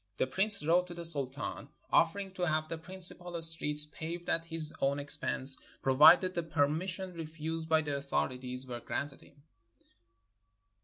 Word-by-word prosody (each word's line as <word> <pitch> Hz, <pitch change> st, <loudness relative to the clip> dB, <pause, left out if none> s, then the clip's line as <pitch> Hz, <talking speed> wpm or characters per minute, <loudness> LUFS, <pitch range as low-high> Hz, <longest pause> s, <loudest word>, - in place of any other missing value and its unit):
The -, -, 0 dB
Prince 190 Hz, +6 st, +6 dB
wrote 175 Hz, +3 st, +2 dB
to 175 Hz, -, -10 dB
the 170 Hz, 0 st, -4 dB
Sultan 140 Hz, -4 st, -3 dB, 0.2 s
offering 190 Hz, +4 st, +1 dB
to 180 Hz, -2 st, -3 dB
have 155 Hz, 0 st, -1 dB
the 165 Hz, -, -6 dB
principal 175 Hz, 0 st, -2 dB
streets 150 Hz, -2 st, +4 dB
paved 165 Hz, +3 st, -8 dB
at 165 Hz, 0 st, -1 dB
his 165 Hz, -2 st, -3 dB
own 140 Hz, +1 st, 0 dB
expense, 140 Hz, -1 st, +2 dB, 0.2 s
provided 150 Hz, +7 st, +5 dB
the 170 Hz, -, -2 dB
permis 160 Hz, +2 st, -1 dB
sion 185 Hz, +1 st, -7 dB
refused 160 Hz, 0 st, -7 dB
by 160 Hz, 0 st, +2 dB
the 145 Hz, -1 st, -4 dB
authorities 130 Hz, -2 st, -4 dB
were 120 Hz, -2 st, -7 dB
granted 140 Hz, +3 st, -6 dB
him. 140 Hz, 0 st, -22 dB
160 Hz, 155 wpm, -30 LUFS, 140-175 Hz, 0.2 s, Prince